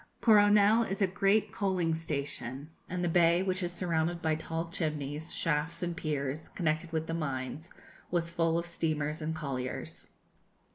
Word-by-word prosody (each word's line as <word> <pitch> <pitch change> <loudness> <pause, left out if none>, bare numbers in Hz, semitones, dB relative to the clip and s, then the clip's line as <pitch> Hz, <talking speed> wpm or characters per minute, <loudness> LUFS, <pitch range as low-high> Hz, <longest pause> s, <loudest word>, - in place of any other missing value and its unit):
Coronel 210 0 +6
is 200 -4 -2
a - - +7
great 195 +3 +2
coaling 185 -5 0
station, 145 -3 -4 0.2
and 180 0 -2
the - - +2
bay, 170 +1 +4
which 185 0 -1
is 175 -1 -1
surrounded 170 -1 0
by 160 -1 +1
tall 165 +1 -3
chimneys, 150 -1 -3
shafts, 160 +1 0
and 175 -1 -2
piers, 150 -2 -3
connected 160 -1 -1
with 160 -1 -1
the 165 - -4
mines, 150 +1 -3 0.4
was 170 -1 -1
full 165 -1 +1
of 170 - -1
steamers 155 -2 -2
and 160 +1 -2
colliers. 135 -5 -4
165 Hz, 155 wpm, -31 LUFS, 155-180 Hz, 0.4 s, a